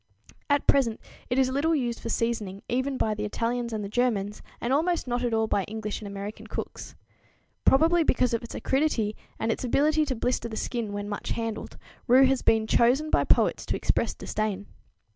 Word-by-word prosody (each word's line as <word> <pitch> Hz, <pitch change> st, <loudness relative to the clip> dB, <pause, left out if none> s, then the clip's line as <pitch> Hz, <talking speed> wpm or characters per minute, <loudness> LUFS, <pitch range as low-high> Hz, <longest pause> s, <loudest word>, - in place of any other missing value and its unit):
At 285 Hz, -1 st, +2 dB
present 240 Hz, -6 st, +3 dB, 0.3 s
it 250 Hz, -, 0 dB
is 260 Hz, -1 st, +3 dB
little 310 Hz, +5 st, +2 dB
used 240 Hz, -5 st, -1 dB
for 230 Hz, -, -6 dB
seasoning, 215 Hz, -4 st, -2 dB
even 260 Hz, +2 st, -1 dB
by 215 Hz, -, +1 dB
the 210 Hz, 0 st, -4 dB
Italians 235 Hz, +3 st, -2 dB
and 215 Hz, -2 st, -3 dB
the -, -, -4 dB
Germans, 210 Hz, -3 st, 0 dB, 0.2 s
and 240 Hz, +2 st, -1 dB
almost 330 Hz, +1 st, +1 dB
not 245 Hz, 0 st, -1 dB
at 240 Hz, -, 0 dB
all 220 Hz, 0 st, +2 dB
by 200 Hz, -2 st, 0 dB
English 215 Hz, 0 st, -5 dB
and 210 Hz, -, -6 dB
American 200 Hz, +1 st, -7 dB
cooks. -, -, -6 dB, 0.7 s
Probably 325 Hz, +5 st, +5 dB
because 250 Hz, -5 st, +2 dB
of 230 Hz, -, 0 dB
its 235 Hz, -, -8 dB
acridity 265 Hz, -7 st, 0 dB, 0.2 s
and 225 Hz, +1 st, 0 dB
its -, -, -3 dB
ability 300 Hz, +5 st, +2 dB
to 265 Hz, -3 st, -2 dB
blister 240 Hz, 0 st, -1 dB
the 220 Hz, -, -6 dB
skin 230 Hz, -3 st, -3 dB
when 205 Hz, 0 st, -4 dB
much 205 Hz, 0 st, -5 dB
handled, 225 Hz, -1 st, -4 dB, 0.3 s
rue 260 Hz, +2 st, +7 dB
has 265 Hz, 0 st, +2 dB
been 220 Hz, -1 st, +3 dB
chosen 255 Hz, +8 st, +3 dB
by -, -, +3 dB
poets -, -, +3 dB
to -, -, 0 dB
express -, -, 0 dB
disdain. 205 Hz, -2 st, -3 dB
235 Hz, 195 wpm, -27 LUFS, 215-265 Hz, 0.7 s, rue